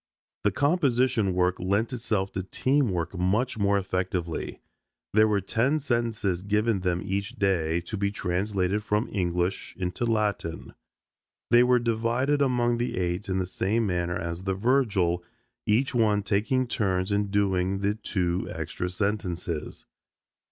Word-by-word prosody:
The 105 - +4
composition 130 - +2
work 90 0 +1
lent 100 +7 0
itself 110 -5 -1
to 95 - -2
team 130 +7 +1
work 85 -1 -2
much 105 +7 0
more 100 0 +3
effectively. 90 -3 -2 0.5
There 110 +1 +5
were 105 -2 +1
ten 120 - +1
sentences 115 - -1
given 105 +2 +1
them 90 0 -1
each 100 +1 -2
day 85 -4 +1
to 90 +5 -6
be 100 0 +1
translated 100 +1 -1
from 105 +2 0
English 90 -1 -1
into 90 +5 -2
Latin. 105 -7 -1 0.8
They 120 - +7
were 125 0 +5
divided 120 +5 +1
among 120 -3 +2
the 120 -4 -2
eight 90 +2 -2
in 95 - 0
the 95 - 0
same 105 +5 0
manner 90 -2 -1
as 85 0 -4
the 95 0 -1
Virgil, 100 -7 +1 0.4
each 120 +7 +2
one 105 -4 +2
taking 110 +6 +1
turns 95 -4 -1
in 100 0 +1
doing 95 -1 +1
the 100 +1 +1
two 90 -4 -2
extra 90 - -4
sentences. 90 -5 -3
100 Hz, 145 wpm, -27 LUFS, 90-115 Hz, 0.8 s, They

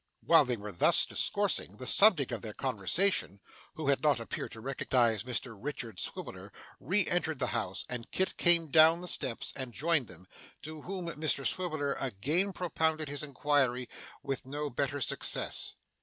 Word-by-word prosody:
While - - +6
they 125 -1 -2
were 105 0 -7
thus 85 - +4
discoursing, 105 - -1
the 130 - -7
subject 175 - +5
of 115 -4 -4
their 110 -2 -7
conversation 130 - 0 0.4
(who 155 -3 -2
had 140 - +2
not 145 -5 +3
appeared 115 - -5
to 110 - -9
recognise 120 -4 +1
Mr 125 -1 -3
Richard 115 -4 -6
Swiveller) - - -6 0.3
re 190 +5 +2
entered 160 -3 0
the 130 - -1
house, 100 -5 -2
and 120 -2 -5
Kit 190 - -1
came 170 -3 +3
down 160 +2 +6
the 180 - -6
steps 125 -8 -1
and 130 -3 -4
joined 155 -2 +1
them; 90 0 -12 0.4
to 155 0 -8
whom 185 +2 -5
Mr 150 -4 -1
Swiveller 155 -6 0
again 140 - 0
propounded 160 -4 -1
his 145 -1 -3
inquiry 135 -3 0 0.4
with 135 -1 -4
no 145 +2 -4
better 140 +3 -2
success. - - -1
140 Hz, 165 wpm, -31 LUFS, 120-160 Hz, 0.4 s, While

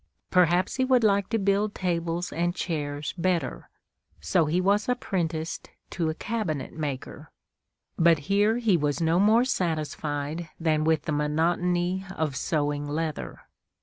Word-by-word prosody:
Perhaps 180 +2 +3
he 260 - +2
would 255 -2 +3
like 200 -2 +3
to 225 - +1
build 200 +1 +1
tables 170 -1 -2
and 175 +2 0
chairs 145 -5 -3
better, 170 -7 -1 0.5
so 85 - +2
he 160 +4 +1
was 200 +4 +2
apprenticed 170 -8 -2 0.2
to 165 -3 -1
a 155 - -3
cabinet 165 - -3
maker; 145 -5 -5 0.7
but 165 -1 +6
here 205 +3 +3
he 225 -6 +3
was 145 -3 0
no 165 +1 +2
more 220 +5 +5
satisfied 155 - -2
than 155 -2 +1
with 160 -2 +2
the - - -3
monotony 175 +5 0
of 155 -4 -1
sewing 145 0 -1
leather. 155 +1 -4
170 Hz, 140 wpm, -26 LUFS, 155-190 Hz, 0.7 s, but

